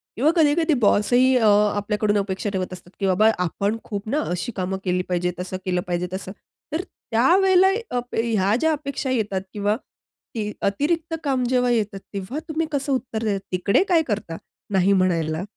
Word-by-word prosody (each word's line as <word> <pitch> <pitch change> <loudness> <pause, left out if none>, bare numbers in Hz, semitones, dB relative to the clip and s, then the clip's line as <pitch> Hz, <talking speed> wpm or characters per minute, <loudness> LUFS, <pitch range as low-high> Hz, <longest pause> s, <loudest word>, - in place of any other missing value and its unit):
किंवा 280 +8 +3
कधीकधी 320 0 +3
बॉसही 245 +5 +4
अ, 225 -3 +3 0.3
आपल्याकडून 210 0 0
अपेक्षा 195 +1 -2
ठेवत 185 -1 -2
असतात, 180 -1 -12
की 200 - 0
बाबा 195 +4 +4
आपण 200 +5 -1
खूप 205 -1 -6
ना 290 - +1
अशी 180 +7 -2
कामं 190 0 -2
केली 180 0 +1
पाहिजे 180 0 0
तसं 180 +1 -4
केलं 180 -1 0
पाहिजे 175 0 -1
तसं. 190 0 -5 0.4
तर 320 - 0 0.3
त्यावेळेला 365 +10 +5 0.3
अप 245 0 -5
ह्या 220 -3 +1
ज्या 320 +3 +2
अपेक्षा 280 -2 -3
येतात 210 -6 -1
किंवा 205 0 0 0.6
ती 210 -2 -2
अतिरिक्त 315 - 0
काम 265 -4 0
जेव्हा 250 -1 +2
येतात 210 -4 0
तेव्हा 200 +9 -4
तुम्ही 315 +1 0
कसं 280 -1 -1
उत्तर 240 -3 -3
देतात, 205 -3 0
तिकडे 185 - +2
काय 340 -3 +5
करता 205 -7 -3 0.4
नाही 190 +1 +4
म्हणायला? 170 -3 +1
210 Hz, 170 wpm, -23 LUFS, 190-260 Hz, 0.6 s, त्यावेळेला